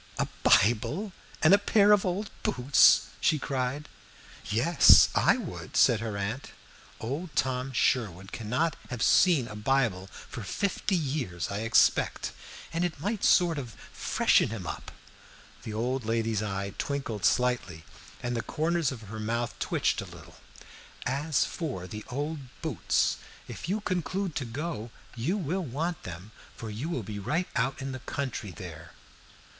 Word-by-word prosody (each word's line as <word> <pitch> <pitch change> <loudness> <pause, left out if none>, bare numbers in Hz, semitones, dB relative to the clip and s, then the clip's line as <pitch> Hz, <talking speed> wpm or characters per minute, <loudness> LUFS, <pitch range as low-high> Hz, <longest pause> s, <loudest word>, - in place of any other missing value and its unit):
"A - - 0
Bible 120 - +3 0.3
and 160 +4 +7
a 200 - +7
pair 205 0 +4
of 205 -2 +4
old 195 +4 -2
boots!" 125 +3 +5
she 155 - +3
cried. 135 +1 -2 0.6
"Yes, 130 +10 +7
I - - +4
would," - - -6
said 115 - +5
her 110 -2 -4
aunt. 105 +7 -3 0.5
"Old 140 +7 -5
Tom 130 0 0
Sherwood 100 -7 0
cannot 125 +9 -1
have 125 -1 -3
seen 155 -4 +4
a 105 - -8
Bible 105 -4 0
for 115 - -10
fifty 195 - -1
years, 130 - -2
I 100 - -2
expect, 115 +1 +2 0.4
and 165 +1 0
it 170 -4 -2
might 205 +6 -2
sort 170 -4 +4
of 120 -6 -8 0.2
freshen - - +2
him 105 -5 -6
up." - - -6 0.7
The 110 - -6
old 125 +3 -1
lady's 115 -1 0
eye 100 -2 -3
twinkled 130 -8 -3
slightly 120 -9 +1 0.4
and 120 0 -1
the 115 - 0
corners 165 +1 0
of 125 -4 -7
her 110 +2 -8
mouth 115 +2 -2
twitched - - 0
a - - -7
little. - - -13 0.7
"As 140 +4 +1
for 135 - -4
the 105 +3 -7
old 145 +4 -3 0.2
boots, - - +1 0.3
if - - -7
you 210 +3 0
conclude 185 -1 -2
to 130 - -2
go, 120 -1 -4 0.3
you 145 - -1
will 185 +1 -2
want 160 +4 -3
them, 90 +4 -9 0.3
for 110 -1 -6
you 120 +10 -4
will 130 -9 -2
be 105 +1 -6
right 170 - -1
out 135 +1 0
in 135 - -3
the 130 - -6
country 130 -5 -4
there." 85 -4 -10
125 Hz, 155 wpm, -28 LUFS, 110-160 Hz, 0.7 s, and